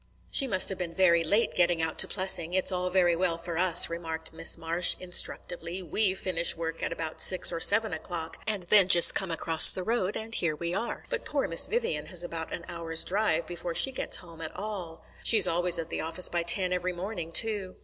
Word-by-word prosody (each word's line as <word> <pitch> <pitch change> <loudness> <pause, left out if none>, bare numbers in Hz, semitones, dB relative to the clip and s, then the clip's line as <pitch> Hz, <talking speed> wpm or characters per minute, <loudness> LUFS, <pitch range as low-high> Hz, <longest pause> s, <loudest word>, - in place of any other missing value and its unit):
"She 275 - +4
must 190 -6 +2
have 195 - -5
been 170 -2 -6
very 170 -3 +2
late 205 +8 -1
getting 175 -1 0
out 160 -1 -4
to - - +5
Plessing. 185 -3 -1
It's 185 - +1
all 180 0 -3
very 180 -2 +1
well 170 -1 -2
for 170 0 -8
us," 185 -2 +3
remarked 165 -1 -7
Miss 165 0 -1
Marsh 165 +2 0
instructively; 180 0 -3
"we 190 +3 0
finish 170 -3 -1
work 165 0 -7
at - - -4
about 160 -1 -7
six 185 -1 +5
or 170 - -5
seven 220 +6 +3
o'clock, 165 -2 -6
and 210 -4 -4
then 190 +1 +4
just 175 -3 +7
come 190 - -1
across 165 -1 +7
the 185 - +5
road, 210 -2 -3
and 220 +1 -8
here 165 -7 -3
we 170 +2 -6
are. 225 +5 -6
But - - -4
poor - - -3
Miss - - +4
Vivian 475 +1 -4
has 180 -2 -6
about 165 -2 -8
an 170 - -8
hour's 165 -2 -3
drive 185 -4 -2
before 175 0 -7
she 270 - +1
gets 260 - -2
home 165 -2 -15
at 160 - -9
all." 190 -6 -9 0.2
"She's 215 -5 +7
always 175 +1 +1
at 165 0 -6
the - - -5
office 165 +3 -1
by 175 - -2
ten 180 +2 +1
every 180 0 -4
morning, 175 -2 -8
too." 205 -1 +2
175 Hz, 220 wpm, -26 LUFS, 165-190 Hz, 0.2 s, just